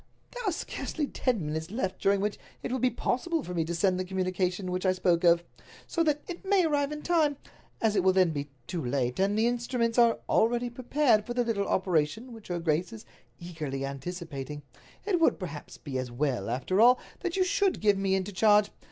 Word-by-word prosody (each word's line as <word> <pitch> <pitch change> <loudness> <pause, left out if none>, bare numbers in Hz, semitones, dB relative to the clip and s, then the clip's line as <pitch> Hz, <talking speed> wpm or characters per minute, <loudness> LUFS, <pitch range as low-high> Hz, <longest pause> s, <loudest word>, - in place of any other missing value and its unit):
"There - - -6
are - - 0
scarcely 320 -1 -3
ten 245 - -1
minutes 160 +2 -3
left 190 -4 -3
during 195 0 +3
which 210 0 -2 0.2
it - - -3
will 260 - -1
be 255 - +3
possible 275 +6 -1
for 180 - -6
me 170 -2 +1
to 170 +1 -3
send 185 +1 +2
the - - 0
communication 185 0 -1
which 180 0 -2
I 185 -1 +3
spoke 180 -1 +1
of, 170 0 +5 0.4
so 335 - -1
that 300 -2 0
it 355 +1 -7
may 385 -2 +3
arrive 290 -2 +1
in 300 0 -6
time. 310 -5 +2 0.4
As 220 -2 +1
it 190 - +2
will 190 - +5
then 185 -2 +3
be 145 -1 -4 0.2
too 170 +3 -4
late, 125 +1 -1
and 200 +2 +2
the 220 - +3
instruments 240 0 0
are 235 -1 +5
already 240 +2 +2
prepared 245 -2 +2
for 240 - -4
the 245 - +2
little 215 -4 -1
operation 190 - 0
which 225 -2 -12
her 175 - -2
grace 165 +2 0
is 225 -2 -10 0.3
eagerly 155 -6 -4
anticipating, 145 -1 -6 0.4
it 390 -4 +1
would, 330 - +3
perhaps, 160 -6 -7
be 130 -2 -4
as 130 -1 -4
well, 125 -5 -1
after 130 - 0
all, 250 +2 +7 0.2
that 360 0 -3
you 375 - +4
should 390 +1 +1
give 205 -1 +4
me 195 -1 +1
into 190 +1 -2
charge. 210 +1 +4
195 Hz, 215 wpm, -28 LUFS, 170-245 Hz, 0.4 s, all